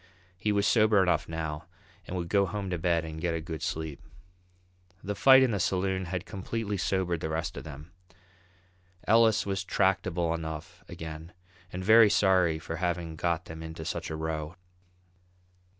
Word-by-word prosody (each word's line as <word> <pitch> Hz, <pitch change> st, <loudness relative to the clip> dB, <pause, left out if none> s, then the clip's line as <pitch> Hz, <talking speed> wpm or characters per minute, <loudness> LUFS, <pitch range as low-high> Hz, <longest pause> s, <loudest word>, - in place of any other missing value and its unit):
He 105 Hz, +3 st, -1 dB
was 100 Hz, 0 st, +1 dB
sober 105 Hz, -3 st, +4 dB
enough 85 Hz, -3 st, 0 dB
now 80 Hz, -2 st, -4 dB, 0.4 s
and 95 Hz, -, -4 dB
would 85 Hz, -1 st, -3 dB
go 100 Hz, +2 st, +2 dB
home 95 Hz, 0 st, -4 dB
to 90 Hz, -, -2 dB
bed 85 Hz, -1 st, +1 dB
and 80 Hz, 0 st, -7 dB
get 85 Hz, -1 st, 0 dB
a -, -, -2 dB
good 80 Hz, 0 st, -6 dB
sleep. 80 Hz, -3 st, -4 dB, 1.0 s
The 105 Hz, -, -2 dB
fight 130 Hz, +4 st, +7 dB
in 130 Hz, -, +2 dB
the 100 Hz, -, -1 dB
saloon 95 Hz, +1 st, 0 dB
had 90 Hz, +2 st, -4 dB
completely 105 Hz, +1 st, -4 dB
sobered 90 Hz, -2 st, 0 dB
the 80 Hz, -, -3 dB
rest 80 Hz, +2 st, -3 dB
of -, -, -8 dB
them. 75 Hz, +1 st, -10 dB, 1.2 s
Ellis 110 Hz, 0 st, +4 dB
was 95 Hz, -1 st, -2 dB
tractable 95 Hz, -3 st, +1 dB
enough 80 Hz, -2 st, -6 dB
again, 80 Hz, +1 st, -8 dB, 0.4 s
and 90 Hz, +1 st, -5 dB
very 110 Hz, +1 st, +7 dB
sorry 95 Hz, -5 st, +3 dB
for 80 Hz, +1 st, -6 dB
having 85 Hz, -2 st, -2 dB
got 85 Hz, +1 st, -1 dB
them 80 Hz, 0 st, -9 dB
into 80 Hz, 0 st, -7 dB
such -, -, -4 dB
a 80 Hz, -, -4 dB
row. 80 Hz, +1 st, -4 dB
90 Hz, 165 wpm, -29 LUFS, 80-100 Hz, 1.2 s, fight